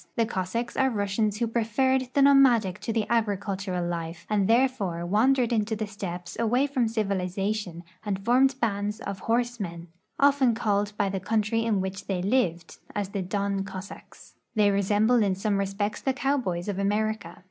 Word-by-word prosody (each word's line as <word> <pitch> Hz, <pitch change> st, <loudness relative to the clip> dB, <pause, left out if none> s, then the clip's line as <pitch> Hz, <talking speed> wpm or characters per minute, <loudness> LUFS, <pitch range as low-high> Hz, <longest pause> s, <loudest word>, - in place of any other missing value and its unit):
The 230 Hz, -, +2 dB
Cossacks 225 Hz, +3 st, -3 dB
are 265 Hz, -1 st, +3 dB
Russians 205 Hz, -1 st, -1 dB
who 235 Hz, -, 0 dB
preferred 250 Hz, +3 st, +1 dB
the 280 Hz, -, +5 dB
nomadic 245 Hz, -9 st, +5 dB
to 215 Hz, -, -3 dB
the 220 Hz, -1 st, 0 dB
agricultural 200 Hz, -5 st, -1 dB
life, 170 Hz, 0 st, -5 dB
and 200 Hz, -2 st, +2 dB
therefore 225 Hz, -8 st, +1 dB
wandered 240 Hz, +6 st, +2 dB
into 220 Hz, 0 st, 0 dB
the 215 Hz, 0 st, -3 dB
steppes 180 Hz, -4 st, -6 dB
away 240 Hz, +4 st, +2 dB
from 265 Hz, -5 st, 0 dB
civilization 195 Hz, -3 st, -2 dB, 0.2 s
and 205 Hz, -3 st, -1 dB
formed 260 Hz, +2 st, +4 dB
bands 210 Hz, -2 st, -1 dB
of 200 Hz, -3 st, -5 dB
horse 240 Hz, +3 st, 0 dB
men, 170 Hz, -3 st, -6 dB, 0.7 s
called 205 Hz, -3 st, +1 dB
often 210 Hz, -, -21 dB
by 205 Hz, -, +1 dB
the 195 Hz, 0 st, -2 dB
country 220 Hz, +3 st, 0 dB
in 215 Hz, -4 st, +1 dB
which 190 Hz, +1 st, -5 dB
they 185 Hz, -2 st, -1 dB
lived, 195 Hz, -6 st, 0 dB, 0.2 s
as 205 Hz, -2 st, -2 dB
the 200 Hz, -1 st, -3 dB
Don 200 Hz, +1 st, -1 dB
Cossacks. 195 Hz, 0 st, -10 dB, 0.2 s
They 210 Hz, -2 st, +4 dB
resemble 210 Hz, +4 st, +3 dB
in 195 Hz, -3 st, +2 dB
some 200 Hz, +1 st, 0 dB
respects 200 Hz, +2 st, -2 dB
the 265 Hz, -, 0 dB
cowboys 255 Hz, -11 st, -1 dB
of 200 Hz, -2 st, -2 dB
America. 215 Hz, +2 st, -1 dB
205 Hz, 170 wpm, -26 LUFS, 195-230 Hz, 0.7 s, the